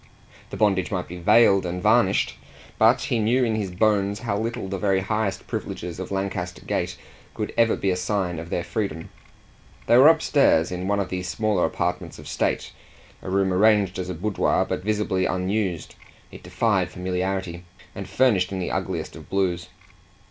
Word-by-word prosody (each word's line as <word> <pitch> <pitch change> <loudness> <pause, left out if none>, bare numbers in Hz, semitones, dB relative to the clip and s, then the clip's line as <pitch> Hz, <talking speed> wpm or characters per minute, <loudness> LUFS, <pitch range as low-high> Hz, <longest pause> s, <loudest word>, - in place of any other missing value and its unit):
The - - -7
bondage 95 -4 +2
might 90 -3 -3
be 90 - -8
veiled 100 +1 +5
and 90 0 -3
varnished, 105 0 +3 0.5
but - - +5
he 120 - -1
knew 120 +4 +2
in 115 -2 +1
his 105 -3 -2
bones 100 +1 +1
how 115 -4 -2
little 115 0 -3
the 95 0 -4
very 95 -1 +1
highest 105 0 -2
privileges 90 0 -5
of 95 - -5
Lancaster 95 -2 -4
Gate - - -2 0.4
could - - -4
ever 115 -1 +3
be 95 - 0
a - - 0
sign 90 -2 -2
of 85 +1 -8
their 85 - -2
freedom. 90 -7 -4 0.7
They 120 - +5
were 135 - +8
upstairs, 145 - +4
in 90 +1 -4
one 100 0 +1
of 95 -2 -2
the 90 0 -3
smaller 95 +1 0
apartments - - -3
of - - -11
state, - - -1 0.5
a - - -7
room 95 0 +1
arranged 100 -1 +3
as 90 0 -4
a 90 - -4
boudoir, 100 +4 0
but - - -3
visibly 105 -3 0
unused 95 -2 -2 0.4
it - - -11
defied - - 0
familiarity 90 -1 -3 0.3
and 100 - -7
furnished 105 -8 +2
in 95 - -3
the 90 - -3
ugliest - - -3
of - - -12
blues. 90 -2 -1
95 Hz, 175 wpm, -24 LUFS, 90-105 Hz, 0.7 s, were